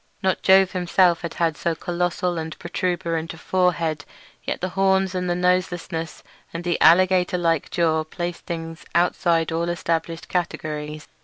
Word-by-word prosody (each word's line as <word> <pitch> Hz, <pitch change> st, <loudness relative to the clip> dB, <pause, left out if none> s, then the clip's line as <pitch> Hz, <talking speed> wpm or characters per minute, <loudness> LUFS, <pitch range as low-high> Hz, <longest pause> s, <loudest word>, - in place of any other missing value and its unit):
Not 190 Hz, -1 st, +1 dB
Jove 190 Hz, 0 st, +5 dB
himself 180 Hz, -1 st, +2 dB
had 170 Hz, -1 st, -1 dB
so 165 Hz, +2 st, -1 dB
colossal 175 Hz, 0 st, -1 dB
and 160 Hz, 0 st, -6 dB
protuberant 170 Hz, -2 st, -2 dB
a -, -, -14 dB
forehead, 170 Hz, -4 st, 0 dB, 0.4 s
yet -, -, -3 dB
the 185 Hz, -, -2 dB
horns 190 Hz, 0 st, +2 dB
and 180 Hz, -1 st, -2 dB
the 175 Hz, -, +1 dB
noselessness 180 Hz, -2 st, -1 dB, 0.3 s
and 170 Hz, +1 st, -5 dB
the 175 Hz, -1 st, -1 dB
alligator 180 Hz, +1 st, +5 dB
like 165 Hz, -3 st, 0 dB
jaw 160 Hz, -2 st, +1 dB
placed 175 Hz, +2 st, -6 dB
the -, -, -1 dB
things 165 Hz, -1 st, -8 dB
outside 170 Hz, -1 st, +2 dB
all 170 Hz, +1 st, -1 dB
established 165 Hz, -1 st, -2 dB
categories. 155 Hz, -4 st, -3 dB
175 Hz, 150 wpm, -23 LUFS, 165-180 Hz, 0.4 s, Jove